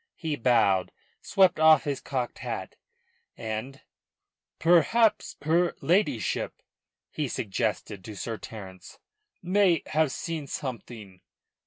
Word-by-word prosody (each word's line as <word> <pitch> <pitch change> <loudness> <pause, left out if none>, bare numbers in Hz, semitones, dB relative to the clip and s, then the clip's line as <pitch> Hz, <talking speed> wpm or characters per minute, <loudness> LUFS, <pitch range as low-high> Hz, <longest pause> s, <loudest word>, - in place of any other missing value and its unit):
He 160 -3 -3
bowed, 110 -8 +2 0.3
swept 190 -4 +3
off 160 0 +6
his 145 -3 -3
cocked 125 -3 -3
hat, - - -5 0.6
and 110 +5 -5 0.8
"Perhaps 175 +7 +3
her 170 +3 +2
ladyship," 165 - 0 0.5
he 150 -2 -2
suggested 100 -3 -3
to 110 - -8
Sir 115 +2 -5
Terence, 95 -4 -10 0.5
"may 180 -3 +3
have 155 -2 +1
seen 160 -2 -4
something." 115 -9 -7
140 Hz, 105 wpm, -27 LUFS, 110-165 Hz, 0.8 s, off